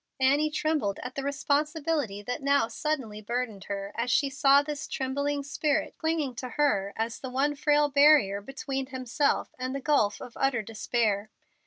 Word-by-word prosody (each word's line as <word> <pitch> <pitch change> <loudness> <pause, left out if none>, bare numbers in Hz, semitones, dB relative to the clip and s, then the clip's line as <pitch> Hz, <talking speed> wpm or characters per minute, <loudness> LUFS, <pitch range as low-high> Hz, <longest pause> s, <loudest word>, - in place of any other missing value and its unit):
Annie 285 +4 +3
trembled 300 -10 0
at 250 +1 -6
the 275 - -3
responsibility 285 -4 -1
that 245 +7 -4
now 280 -3 +3
suddenly 260 -8 -3
burdened 225 -3 -3
her 200 0 -5
as 235 +2 -1
she 275 +2 +2
saw 275 +1 +5
this 295 0 -5
trembling 280 +2 -2
spirit 290 +1 -1
clinging 320 -5 -1
to 255 0 -5
her 200 -10 +2
as 225 +1 -3
the 260 - -6
one 275 +3 +1
frail 295 0 +3
barrier 280 -9 +5
between 270 +2 -4
himself 260 +2 -1
and 255 +1 -3
the - - -2
gulf 260 -8 +2
of 245 - -9
utter 265 -5 +1
despair. 215 -1 -1
270 Hz, 165 wpm, -28 LUFS, 230-290 Hz, -, saw